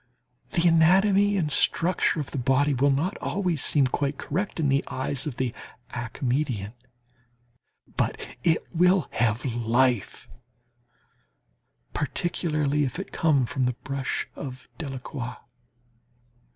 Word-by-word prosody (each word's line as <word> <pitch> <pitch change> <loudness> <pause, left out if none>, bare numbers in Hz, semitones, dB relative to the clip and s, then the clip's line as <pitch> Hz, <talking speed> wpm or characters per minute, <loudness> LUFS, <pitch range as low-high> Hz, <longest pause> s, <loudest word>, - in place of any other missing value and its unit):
The 170 +1 +3
anatomy 195 +5 +4
and 155 -5 0
structure 170 +3 +2
of 145 - -4
the 140 - -3
body 135 +3 +2
will 140 +2 +3
not 150 +8 0
always 180 -6 -1
seem 145 -3 +5
quite 140 +2 -1
correct 185 +4 -3
in 155 - +2
the 135 0 +2
eyes 130 +2 -3
of 140 - -4
the 125 -3 -1 0.4
academician. 120 -2 -2 1.2
But - - 0 0.2
it 165 -2 +2
will 180 -2 +3
have 115 +2 0
life, 120 -1 0 1.7
particularly 150 -1 0
if 130 +1 -3
it 195 - -6
come 145 -6 +2
from 130 +2 -1
the 125 -1 0
brush 135 -2 -2
of 130 -2 -8
Delacroix. 130 -4 -5
140 Hz, 120 wpm, -26 LUFS, 125-165 Hz, 1.7 s, seem